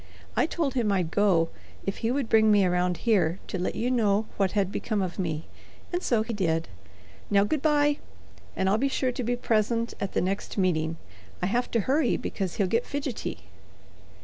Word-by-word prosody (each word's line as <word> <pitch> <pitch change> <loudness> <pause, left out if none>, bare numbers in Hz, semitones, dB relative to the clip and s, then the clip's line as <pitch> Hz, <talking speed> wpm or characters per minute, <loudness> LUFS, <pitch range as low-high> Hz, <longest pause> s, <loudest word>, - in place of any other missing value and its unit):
I - - +3
told 320 -5 -1
him 235 -6 +1
I'd 180 -4 0
go 180 -5 +3 0.4
if 195 - -2
he 225 - -1
would 265 -1 0
bring 220 -1 +5
me 205 -2 +5
around 180 0 +1
here 190 -7 +3
to 190 - -4
let 180 - -2
you 245 +2 0
know 215 -3 +2
what 195 -2 +1
had 200 -2 +1
become 215 0 -2
of 185 0 -3
me, 160 -4 -2 0.5
and 355 - 0
so 230 -9 +2
he 230 +1 -4
did. 165 -5 0 0.6
Now, 200 -1 +4
good 290 +7 0
by, 295 -1 +3 0.6
and 190 - 0
I'll 205 +3 +3
be 275 - +2
sure 260 -1 0
to 250 - -4
be 245 +2 0
present 230 0 0
at 195 - -2
the - - +2
next 195 +4 -2
meeting. 165 -4 +1 0.5
I - - +3
have 240 +6 0
to 230 - +1
hurry 270 +4 +2
because 190 -4 -3
he'll 200 - +2
get 230 +6 +1
fidgety." 280 -4 -4
210 Hz, 200 wpm, -27 LUFS, 185-245 Hz, 0.6 s, bring